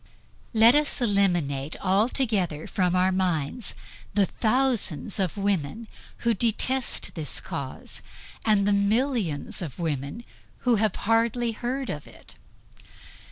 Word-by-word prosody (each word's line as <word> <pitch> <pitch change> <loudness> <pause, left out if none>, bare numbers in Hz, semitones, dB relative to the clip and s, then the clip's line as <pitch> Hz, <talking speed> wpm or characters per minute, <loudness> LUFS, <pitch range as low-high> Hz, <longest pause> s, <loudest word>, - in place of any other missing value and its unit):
Let 225 +2 +7
us 295 0 +2
eliminate 175 - +1
altogether 195 - +1
from 180 -2 0
our 185 +1 +3
minds 185 - -1 0.4
the 205 -2 +4
thousands 220 - 0
of 190 0 -1
women 200 +1 -1 0.4
who 235 - +4
detest 240 +4 +1
this 155 -4 -1
cause, 135 -2 -6 0.4
and 210 -3 +3
the 205 - +3
millions 200 - 0
of 155 -8 -6
women 160 - -3 0.4
who 240 -2 +4
have 215 -2 +1
hardly 230 +2 +2
heard 250 +4 -3
of 150 - -7
it. - - -13
200 Hz, 115 wpm, -26 LUFS, 175-235 Hz, 0.4 s, Let